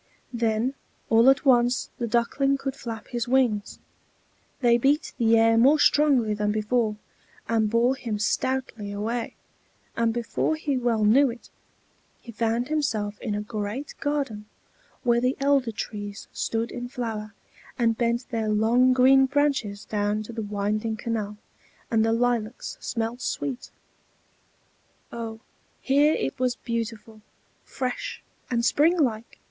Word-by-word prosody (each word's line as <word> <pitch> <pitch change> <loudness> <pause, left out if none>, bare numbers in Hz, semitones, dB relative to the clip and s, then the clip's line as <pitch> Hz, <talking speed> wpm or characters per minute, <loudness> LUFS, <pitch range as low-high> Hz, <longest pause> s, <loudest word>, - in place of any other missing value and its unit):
Then 230 +2 0 0.4
all 230 +3 +6
at 270 +2 +3
once 245 -1 +3
the 235 - -1
Duckling 275 +5 +1
could 270 0 -4
flap 230 -4 -7
his 240 -1 -3
wings: 240 -5 +1 0.8
they 240 -2 +5
beat 285 +5 +1
the 230 -1 +4
air 225 0 +4
more 275 +6 +6
strongly 280 -7 +3
than 210 0 0
before, 215 +1 0 0.5
and 220 -2 +1
bore 235 +4 +2
him 230 -5 -4
stoutly 220 -1 -2
away; 225 +4 -3 0.6
and 230 0 +1
before 240 +6 -1
he 300 -3 -2
well 235 -4 +1
knew 265 +6 +5
it, 235 0 -10 0.7
he 235 - -11
found 230 +2 -1
himself 220 -9 -1
in 215 -4 -2
a 210 - -2
great 215 +6 -5
garden, 275 -8 -2 0.6
where 240 -2 +3
the 255 +2 0
elder 275 -3 +2
trees 205 -1 -6
stood 230 +1 -2
in 245 0 -5
flower, 220 -5 -5 0.4
and 230 -2 +2
bent 235 +1 -1
their 225 -2 -1
long 235 +4 +4
green 265 +1 +5
branches 270 -8 0
down 210 0 -1
to 235 - -9
the 225 - -4
winding 210 +2 -2
canal, 215 -2 -3 0.5
and 225 -1 +3
the 225 - +2
lilacs 235 -1 -1
smelt 230 +2 -3
sweet. 265 -2 -3 1.4
Oh, 225 -1 -6 0.4
here 290 +3 +3
it 135 - -3
was 250 -1 +1
beautiful, 230 -2 -5 0.4
fresh, 275 - -4 0.3
and 235 -1 0
springlike! 280 -7 +2
235 Hz, 135 wpm, -25 LUFS, 215-255 Hz, 1.4 s, all